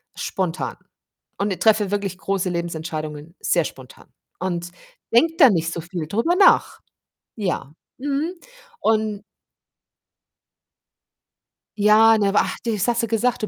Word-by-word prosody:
spontan 185 -2 -3 0.6
und 200 -2 -2
treffe 210 -3 +3
wirklich 200 -3 -2
große 195 -1 -2
Lebensentscheidungen 160 -2 -5
sehr 170 -2 +1
spontan 130 -2 -11 0.3
und 175 -1 -3 0.4
denke 325 +7 +4
da 275 -8 +8
nicht 165 -3 0
so 170 - -4
viel 170 -2 -6
drüber 230 - +1
nach. 390 - +4 0.6
Ja, 180 -8 -3 0.2
mhm 290 +6 -2 0.5
und 215 -2 0 2.5
Ja, 215 +2 +6
ne 200 -2 +2
ach, 205 - +1
das 220 -3 -1
hast 235 0 +1
du 230 - 0
gesagt, 230 +1 0
du - - 0
200 Hz, 120 wpm, -22 LUFS, 170-225 Hz, 2.5 s, da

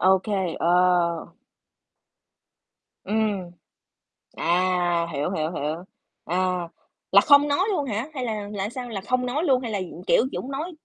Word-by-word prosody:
OK, 190 +3 +3 0.3
ờ. 175 -1 +2 1.7
Ừm. 210 -4 -1 0.8
À, 175 -1 +1
hiểu, 145 +5 -1
hiểu, 155 -3 -1
hiểu. 155 -2 -2 0.5
À. 180 0 0 0.4
Là 200 - +8
không 285 +2 +6
nói 285 +6 +2
luôn 300 -8 0
hả? 230 +2 -2
Hay 260 -4 -4
là 215 -3 -3
là 200 -1 -3
sao? 250 0 -6
Là 200 -4 -4
không 250 +5 0
nói 285 +7 -1
luôn, 265 -5 +3
hay 235 - -4
là, 205 - -1
ừm, 180 -1 -7
kiểu, - - +5
chỉ - - -4
muốn 265 - -5
nói 305 +6 -4
195 Hz, 155 wpm, -24 LUFS, 180-250 Hz, 1.7 s, Là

